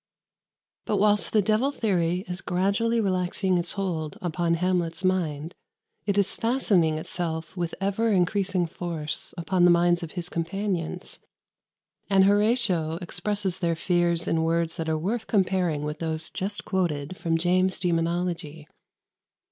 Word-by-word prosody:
] - - -64
But - - +1
whilst 210 0 +3
the 215 -2 +3
devil 220 +7 +2
theory 185 -8 0
is 180 +1 -4
gradually 200 +6 +1
relaxing 185 -2 +1
its 175 0 +1
hold 175 -4 -3
upon 170 -2 0
Hamlet's 175 0 -1
mind, 165 -4 0 0.5
it 200 -1 +1
is 200 -1 +3
fastening 200 -10 +2
itself 160 +1 -4
with 170 -2 -3
ever 200 +4 +1
increasing 190 -1 +1
force 160 -2 -3
upon 175 +1 +1
the 175 - +7
minds 175 0 +4
of 165 -2 -7
his 175 -2 -4
companions; 180 0 -3 0.9
and 195 -1 +5
Horatio 200 -6 +3
expresses 195 +1 -2
their 170 -1 0
fears 170 0 +1
in 165 - +1
words 165 +1 0
that 165 -2 -2
are 160 - +1
worth 215 +8 -2
comparing 185 -7 +1
with 150 +1 -4
those 160 -1 -4
just 205 +2 -4
quoted 175 -4 -1
from 165 -2 0
James's 185 +2 +1
"Daemonologie." 170 -3 -1
180 Hz, 140 wpm, -26 LUFS, 165-195 Hz, 0.9 s, the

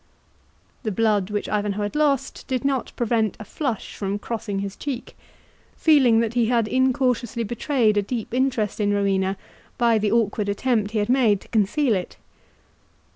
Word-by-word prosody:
The 220 - -2
blood 205 -2 +1
which 205 0 -2
Ivanhoe 205 0 -1
had 205 - -4
lost 290 -3 0
did 260 0 -2
not 270 -3 0
prevent 225 -3 0
a 215 - -8
flush 250 0 -4
from 200 0 -2
crossing 210 -2 -4
his 200 0 -4
cheek, 270 -4 -6 0.6
feeling 260 -8 +5
that 230 -1 -1
he 240 -2 +2
had 230 -2 +2
incautiously 255 -2 +1
betrayed 230 -1 +1
a - - +4
deep 225 +2 -5
interest 250 -6 0
in 205 -1 +1
Rowena 195 -1 +1 0.4
by 235 -2 +3
the 210 -1 0
awkward 210 -2 +1
attempt 215 0 0
he 220 - -3
had 205 -1 +1
made 240 -6 +3
to - - -16
conceal 230 +5 +2
it. 185 -3 -3
225 Hz, 165 wpm, -23 LUFS, 205-250 Hz, 0.6 s, feeling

